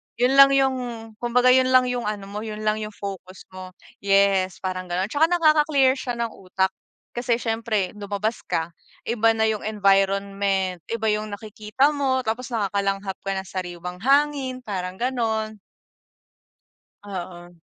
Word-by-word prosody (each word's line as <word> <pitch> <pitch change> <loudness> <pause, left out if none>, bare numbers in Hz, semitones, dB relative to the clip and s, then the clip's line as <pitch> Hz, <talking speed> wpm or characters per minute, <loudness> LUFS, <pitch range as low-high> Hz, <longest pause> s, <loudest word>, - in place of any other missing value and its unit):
'yon 250 +3 +2
lang 275 0 +8
yung, 265 -1 +3 0.4
kumbaga, 245 +1 +3
'yon 255 0 +5
lang 255 0 +5
yung 245 -3 -3
ano 205 -2 -3
mo, 210 - -4
'yon 215 0 -6
lang 215 0 +1
yung 215 -1 -6
focus 190 -2 -8
mo. 185 0 -10 0.2
Yes, 195 -2 +2
parang 185 -1 -3
gano'n, 185 +4 -2
tsaka 315 +3 +3
nakaka-clear 300 -6 +3
siya 245 -2 -3
ng 235 -1 -2
utak, 190 0 -2 0.4
kasi 240 -1 0
siyempre, 225 -4 -1
lumabas 205 +2 -3
ka, 165 +1 -1 0.3
iba 225 -1 +2
na 220 - +1
yung 215 -1 -2
environment, 195 -2 +1
iba 225 -1 -2
yung 210 0 -1
nakikita 215 +7 0
mo, 265 -3 0
tapos 230 +3 -3
nakakalanghap 195 -2 -1
ka 195 - -4
ng 190 -1 -5
sariiwang 180 -1 -6
hangin, 275 -2 +2
parang 185 -3 -4
gano'n. 220 -4 -1 1.5
Oo. 175 -3 -8
215 Hz, 145 wpm, -23 LUFS, 195-250 Hz, 1.5 s, lang